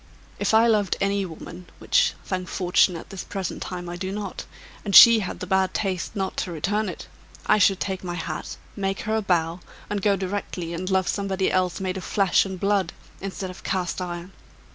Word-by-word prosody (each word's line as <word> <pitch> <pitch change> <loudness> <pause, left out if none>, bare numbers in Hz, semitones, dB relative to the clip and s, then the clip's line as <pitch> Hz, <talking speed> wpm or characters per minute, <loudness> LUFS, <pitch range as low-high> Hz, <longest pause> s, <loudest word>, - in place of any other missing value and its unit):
If - - +1
I 225 +1 +6
loved 210 -4 +2
any 200 -1 0
woman 175 +2 -10
which, - - +2
thank 185 -1 -3
Fortune! 180 0 +2
at 165 - -9
this 195 -2 -6
present 195 -3 -5
time 175 -1 -5
I 175 0 -5
do 190 +1 -4
not 200 -2 -5 0.4
and 200 -2 -1
she 230 -1 +11
had 190 - -5
the - - -3
bad 190 0 +1
taste 190 -1 -2
not 195 -2 -2
to 180 - -2
return 205 +6 -1
it, - - -7 0.4
I - - +4
should 195 -1 +4
take 190 -1 -3
my 175 -1 -4
hat, 165 - -5 0.2
make 195 -1 -2
her 215 0 -1
a 220 - +1
bow, 170 -3 0 0.3
and 205 -1 -1
go 200 0 +3
directly 185 -3 -4
and 185 +2 -4
love 190 -1 +2
somebody 195 -2 0
else 185 -1 +1
made 190 0 -2
of 185 - -6
flesh 195 0 +2
and 190 -1 -6
blood, 195 -3 +1 0.3
instead 190 -1 -5
of 180 - -12
cast 185 -1 -2
iron! 175 0 -5
190 Hz, 205 wpm, -24 LUFS, 180-200 Hz, 0.4 s, she